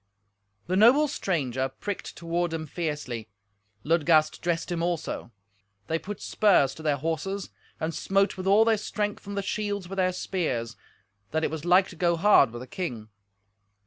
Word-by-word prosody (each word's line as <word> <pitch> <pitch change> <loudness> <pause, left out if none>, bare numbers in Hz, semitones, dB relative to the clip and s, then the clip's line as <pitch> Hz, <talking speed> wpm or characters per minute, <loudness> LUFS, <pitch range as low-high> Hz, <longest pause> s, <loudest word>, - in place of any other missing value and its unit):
The 180 - -1
noble 245 +9 +6
stranger 135 - -1
pricked 200 +8 -6
toward 170 0 -1
him 160 -1 -3
fiercely. 145 -9 -4 0.5
Ludgast 155 -1 +3
dressed 175 0 -1
him 170 -1 -1
also. 170 -7 -3 0.5
They 165 - -1
put 205 +3 -7
spurs 160 -11 +3
to 160 - -11
their 150 -2 +1
horses 165 +6 -3 0.3
and 160 +1 -2
smote 195 +3 +1
with 185 0 -5
all 205 +3 +6
their 225 -1 +3
strength 210 0 -3
on 200 - -5
the 200 - -1
shields 205 -2 -2
with 195 +2 -7
their 185 -1 +2
spears, 155 -11 -2 0.5
that 160 +1 -1
it - - 0
was 160 0 -5
like 185 +2 +5
to - - -11
go 170 -2 +2
hard 170 - +5
with 120 +1 -7
the - - -7
king. 130 - -5
175 Hz, 170 wpm, -27 LUFS, 155-195 Hz, 0.5 s, noble